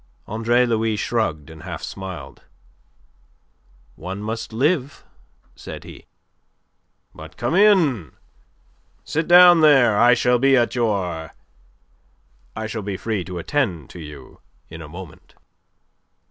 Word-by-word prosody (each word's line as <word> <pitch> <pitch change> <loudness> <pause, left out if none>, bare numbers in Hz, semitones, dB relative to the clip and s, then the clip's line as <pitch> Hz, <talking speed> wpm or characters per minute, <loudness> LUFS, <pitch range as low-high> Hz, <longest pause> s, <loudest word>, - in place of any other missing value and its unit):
Andre 115 +3 +1
Louis 115 -2 0
shrugged 80 -10 -2
and 80 0 -12
half - - -7
smiled. 90 -8 -8 1.5
"One 95 +5 -7
must 115 +2 -5
live," 140 +4 -1 0.5
said - - -9
he. - - -13 1.1
"But 80 +3 -12
come 120 +6 -2
in. 165 - +3 0.9
Sit 160 +1 -2
down 175 -1 +8
there. 130 -9 +5
I 120 0 +6
shall 125 +1 +2
be 135 +1 +4
at 120 -1 +1
your.... 95 - -2 1.2
I 110 - -4
shall 110 0 -5
be 100 -1 -5
free 110 -3 -3
to 90 -1 -7
attend 90 - -2
to 90 - -11
you 75 -5 -12 0.3
in 80 0 -10
a 80 - -10
moment." 85 -1 -12
110 Hz, 120 wpm, -21 LUFS, 85-125 Hz, 1.5 s, down